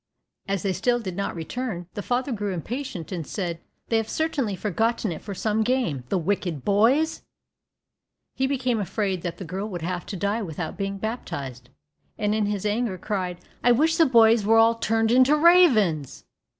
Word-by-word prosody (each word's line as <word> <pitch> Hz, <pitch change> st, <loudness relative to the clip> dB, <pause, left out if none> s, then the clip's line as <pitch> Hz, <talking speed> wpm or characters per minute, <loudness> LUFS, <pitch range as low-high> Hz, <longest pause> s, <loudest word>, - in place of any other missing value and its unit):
As 195 Hz, -2 st, -1 dB
they 195 Hz, -2 st, 0 dB
still 240 Hz, +5 st, +1 dB
did 190 Hz, -6 st, -5 dB
not 200 Hz, 0 st, -3 dB
return, 180 Hz, +2 st, -4 dB
the 205 Hz, -, -4 dB
father 250 Hz, +5 st, -1 dB
grew 205 Hz, -4 st, -2 dB
impatient, 225 Hz, -, -5 dB
and 170 Hz, -6 st, -4 dB
said, 175 Hz, -5 st, -3 dB, 0.3 s
"They 225 Hz, -, +3 dB
have 225 Hz, -1 st, -2 dB
certainly 285 Hz, -10 st, -1 dB
forgotten 220 Hz, +2 st, -1 dB
it 160 Hz, -, -6 dB
for 200 Hz, -2 st, -7 dB
some 215 Hz, +3 st, 0 dB
game, 220 Hz, -, 0 dB
the 190 Hz, -, +1 dB
wicked 175 Hz, -5 st, -2 dB
boys!" 245 Hz, +11 st, +3 dB, 1.1 s
He 265 Hz, 0 st, 0 dB
became 255 Hz, -4 st, 0 dB
afraid 195 Hz, -1 st, -2 dB
that 175 Hz, -1 st, -4 dB
the 190 Hz, -, -7 dB
girl 190 Hz, +6 st, -4 dB
would 175 Hz, -5 st, -6 dB
have 180 Hz, 0 st, -3 dB
to 195 Hz, -, -5 dB
die 205 Hz, +5 st, -1 dB
without 165 Hz, -3 st, -5 dB
being 195 Hz, 0 st, -3 dB
baptized, 140 Hz, -, -5 dB, 0.5 s
and 210 Hz, -1 st, 0 dB
in 215 Hz, -1 st, +1 dB
his 205 Hz, -1 st, -2 dB
anger 210 Hz, -2 st, 0 dB
cried, 185 Hz, -2 st, -3 dB, 0.3 s
"I 245 Hz, -, +6 dB
wish 320 Hz, +6 st, +2 dB
the 325 Hz, -, +5 dB
boys 230 Hz, -3 st, +5 dB
were 225 Hz, +2 st, +4 dB
all 225 Hz, +1 st, +6 dB
turned 225 Hz, 0 st, 0 dB
into 255 Hz, +4 st, +5 dB
ravens." 255 Hz, -, +4 dB
210 Hz, 180 wpm, -25 LUFS, 185-240 Hz, 1.1 s, I